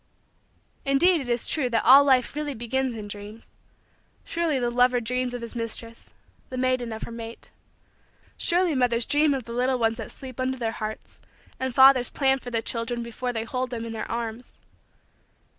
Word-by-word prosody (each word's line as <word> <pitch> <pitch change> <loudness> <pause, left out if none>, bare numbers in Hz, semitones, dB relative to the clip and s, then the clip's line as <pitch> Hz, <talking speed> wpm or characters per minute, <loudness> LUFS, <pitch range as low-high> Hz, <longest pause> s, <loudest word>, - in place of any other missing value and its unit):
Indeed 305 +5 +3
it 255 - -7
is 240 -1 +1
true 275 -6 +1
that 230 -2 0
all 275 +2 +9
life 260 -2 +2
really 295 -2 -3
begins 245 +2 -2
in 210 -2 -7
dreams. 205 +2 -9 0.7
Surely 330 -4 0
the 240 -2 0
lover 250 0 +3
dreams 250 +1 -2
of 240 - -6
his 235 - -7
mistress 230 0 -5 0.4
the 255 - -6
maiden 255 -2 0
of 220 - -6
her - - -7
mate. 230 0 -9 0.8
Surely 350 -1 +2
mothers 245 -3 +1
dream 295 -1 +3
of 260 - -4
the 235 - -8
little 255 +2 +1
ones 225 -1 +1
that 225 - -7
sleep 260 -2 -10
under 260 0 -1
their 230 -2 -2
hearts 215 -1 -7 0.4
and 260 -2 -3
fathers 265 -2 +7
plan 270 -1 +1
for 250 - -8
their 230 -2 -1
children 235 0 -3
before 240 +2 -4
they 225 -2 -3
hold 255 +2 -3
them 230 -2 -5
in 230 - -6
their 220 - -5
arms. 230 +1 -5
245 Hz, 185 wpm, -25 LUFS, 230-265 Hz, 0.8 s, all